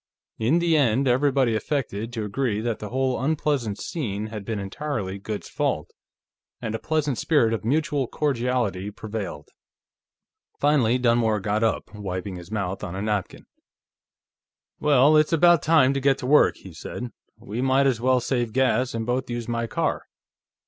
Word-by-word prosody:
In 120 +9 +3
the 170 -1 +2
end, 135 -2 +3
everybody 130 -1 +2
affected 115 -3 -2
to 115 -2 -3
agree 105 0 -1
that 115 0 -2
the 105 - -6
whole 130 0 -1
unpleasant 145 -8 0
scene 110 - -4
had 105 -2 -5
been 110 +1 -3
entirely 100 -1 -4
Goode's 105 +1 -5
fault, - - -2 0.7
and 110 - -4
a 110 - -2
pleasant 150 -5 -1
spirit 120 -8 +2
of 115 - -3
mutual 145 +2 0
cordiality 120 -9 -1
prevailed. 105 -8 -6 1.1
Finally 135 -5 +3
Dunmore 115 -3 +2
got 105 +2 -1
up, 110 -1 -1
wiping 95 -2 -5
his 85 0 -11
mouth 100 -3 -3
on 95 -3 -5
a 95 - -3
napkin. 105 -3 -3 1.3
"Well, 145 0 +5
it's 155 +1 +3
about 175 -1 +5
time 145 -4 +4
to 135 - -2
get 135 0 +3
to - - -6
work," 150 +3 +5
he 95 - -12
said. 120 +9 -7 0.3
"We 110 +5 -5
might 135 +1 +3
as 125 -4 +1
well 130 +1 +3
save 120 -2 -1
gas 130 -1 +1
and 115 -1 -2
both 125 +2 -1
use 120 -1 -4
my 115 0 -2
car. - - -2
120 Hz, 160 wpm, -24 LUFS, 105-140 Hz, 1.3 s, Well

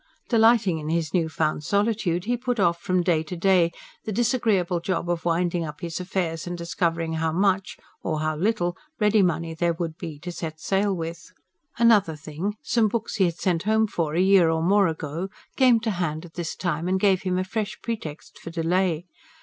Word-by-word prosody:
Delighting 225 -7 +4
in 155 0 -5
his 165 -2 -1
new 165 -3 +1
found 155 -1 -1
solitude, 200 -3 0
he 245 +2 +1
put 245 -1 -2
off 170 -3 +2
from 185 -1 +1
day 170 -3 +2
to 160 +3 -6
day 175 -1 +3 0.3
the 220 - -4
disagreeable 215 -6 +1
job 175 0 -2
of 170 -1 -3
winding 175 0 +1
up 150 0 -7
his 170 -1 -4
affairs 180 -3 -2
and 175 0 -4
discovering 170 -1 -1
how 160 0 0
much 190 +2 +1 0.2
or 155 -2 -2
how 155 0 0
little 175 0 0 0.2
ready 210 0 +4
money 165 -2 0
there 170 +1 +1
would 165 -1 -5
be 155 -3 -6
to 175 +2 -5
set 160 -2 -6
sail 200 +3 +1
with. 165 -2 -5 0.5
Another 215 -8 +4
thing, 160 +7 -4
some 230 -2 +2
books 220 +1 -3
he 195 - +4
had 170 -1 -2
sent 175 -3 0
home 220 +2 +2
for, 165 -7 -2
a - - +2
year 190 -3 +5
or 160 0 0
more 200 +2 +4
ago, 160 +3 -4 0.3
came 255 -4 +5
to 220 -1 -1
hand 170 -3 -2
at 165 - -14
this 170 -2 -4
time, 170 -1 -2
and 190 +1 +1
gave 190 -2 +3
him 185 -1 -1
a 185 - +1
fresh 210 +2 -3
pretext 190 -10 -6
for - - -8
delay. 170 0 0
175 Hz, 200 wpm, -25 LUFS, 165-200 Hz, 0.5 s, year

